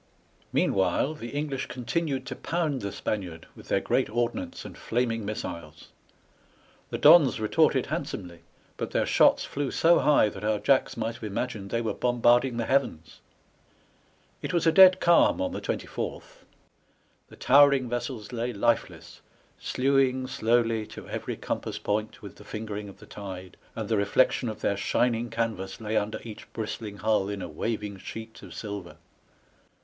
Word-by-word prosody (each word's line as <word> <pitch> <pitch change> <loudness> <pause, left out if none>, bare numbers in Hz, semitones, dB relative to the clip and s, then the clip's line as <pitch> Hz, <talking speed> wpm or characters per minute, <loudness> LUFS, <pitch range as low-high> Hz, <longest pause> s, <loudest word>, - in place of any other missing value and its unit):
Meanwhile, 95 - +1
the 130 -6 -8
EngKsh 145 -2 -2
continued 135 +2 -2
to - - -5
pound 160 -5 -2
the 100 -1 -4
Spaniard 90 -7 -4
with - - -14
their - - +2
great - - 0
ordnance 120 - -3
and - - -9
flaming 115 -1 -1
missiles. 85 -6 -6 1.0
The - - -3
Dons 150 -6 +7
retorted 110 -1 +2
handsomely, 85 -2 -5 0.4
but - - -3
their - - 0
shots - - +4
flew 140 -1 -3
so 170 +5 +4
high 145 -7 +4
that 100 0 -10
our 105 0 +1
Jacks 135 +3 +2
might 115 0 -2
have 115 - -13
imagined 105 -1 -4
they 115 - -1
were 110 - -1
bombarding 120 0 +2
the 115 - -1
heavens. 85 - -1 1.2
It - - -4
was 170 -2 +1
a 165 - +6
dead 185 +2 +8
calm 170 +9 +4
on 280 -1 -1
the - - -5
24th; - - -5 0.8
the - - -15
tower 140 +2 +6
ing 130 -2 0
vessels 120 -2 -4
lay 120 0 -2
lifeless, 115 +3 -1 0.4
slewing 130 -1 +1
slowly 115 -2 +1
to - - -10
every - - -4
compass - - -4
point 105 +1 -3
with 100 - -10
the - - -13
fingering 105 -1 -6
of 100 - -13
the - - -14
tide, 95 -3 -8 0.2
and 110 -2 -4
the 110 - +1
reflection 105 +4 +2
of 110 - -7
their 100 - 0
shining 120 -1 0
canvas 110 -4 -3
lay 110 -1 -3
under 110 0 0
each 110 -2 -10
bristling 110 -2 -5
hull 105 -2 +1
in 100 -2 -4
a - - -4
waving 105 +5 -4
sheet 110 +3 -9
of - - -11
silver. 100 -5 -7
115 Hz, 160 wpm, -27 LUFS, 105-130 Hz, 1.2 s, dead